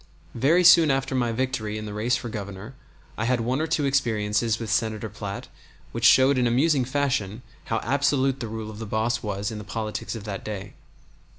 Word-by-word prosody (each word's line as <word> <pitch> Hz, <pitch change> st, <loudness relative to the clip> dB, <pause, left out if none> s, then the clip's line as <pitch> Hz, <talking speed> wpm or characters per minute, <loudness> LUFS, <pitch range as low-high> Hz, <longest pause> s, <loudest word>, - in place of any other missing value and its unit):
Very 155 Hz, +9 st, +3 dB
soon 165 Hz, -2 st, +7 dB
after 135 Hz, -1 st, 0 dB
my 120 Hz, -3 st, +1 dB
victory 115 Hz, -3 st, -2 dB
in 110 Hz, -, -6 dB
the 105 Hz, -, -6 dB
race 115 Hz, +4 st, +1 dB
for -, -, -4 dB
Governor 100 Hz, +1 st, -7 dB, 0.5 s
I 110 Hz, -, 0 dB
had 125 Hz, 0 st, +1 dB
one 125 Hz, +5 st, -1 dB
or 160 Hz, -, -1 dB
two 155 Hz, -2 st, 0 dB
experiences 115 Hz, -4 st, +1 dB
with 115 Hz, -2 st, -5 dB
Senator 110 Hz, -2 st, -1 dB
Platt -, -, -6 dB, 0.4 s
which -, -, -2 dB
showed 130 Hz, +1 st, +6 dB
in 125 Hz, -, +2 dB
amusing 135 Hz, +2 st, +2 dB
fashion 125 Hz, -5 st, -1 dB, 0.2 s
how 115 Hz, -, -1 dB
absolute 135 Hz, 0 st, +1 dB
the 120 Hz, -, -4 dB
rule 110 Hz, 0 st, -6 dB
of 105 Hz, -, -10 dB
the 110 Hz, -, -6 dB
boss 110 Hz, +3 st, 0 dB
was 100 Hz, 0 st, -3 dB
in 110 Hz, -, -6 dB
the -, -, -7 dB
politics 110 Hz, +2 st, -4 dB
of 110 Hz, -, -7 dB
that 100 Hz, -3 st, -5 dB
day. 100 Hz, -1 st, -6 dB
115 Hz, 200 wpm, -25 LUFS, 105-135 Hz, 0.5 s, soon